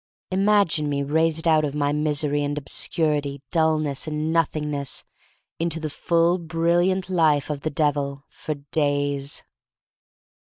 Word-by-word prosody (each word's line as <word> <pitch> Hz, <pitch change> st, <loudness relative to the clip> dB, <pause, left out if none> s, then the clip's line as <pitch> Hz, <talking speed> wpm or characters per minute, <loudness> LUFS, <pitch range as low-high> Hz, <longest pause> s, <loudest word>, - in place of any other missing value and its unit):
Imagine 195 Hz, -6 st, +2 dB
me 140 Hz, -1 st, -1 dB
raised 160 Hz, +3 st, +1 dB
out 155 Hz, -1 st, +4 dB
of 145 Hz, -1 st, -2 dB
my 145 Hz, -1 st, 0 dB
misery 150 Hz, -1 st, 0 dB
and 145 Hz, 0 st, -2 dB
obscurity, 145 Hz, -1 st, -1 dB
dullness 155 Hz, -4 st, +1 dB
and 155 Hz, +1 st, -2 dB
Nothing 155 Hz, -2 st, 0 dB
ness, 140 Hz, -2 st, -2 dB, 0.6 s
into 165 Hz, -1 st, -2 dB
the 155 Hz, -2 st, -4 dB
full, 170 Hz, +4 st, +2 dB
brilliant 175 Hz, +3 st, +1 dB
life 155 Hz, -6 st, +2 dB
of 145 Hz, -2 st, -4 dB
the 155 Hz, -, -2 dB
Devil 145 Hz, -2 st, -1 dB
— -, -, -49 dB
for 155 Hz, -, -2 dB
days! 145 Hz, -1 st, 0 dB
150 Hz, 135 wpm, -23 LUFS, 145-165 Hz, 0.6 s, out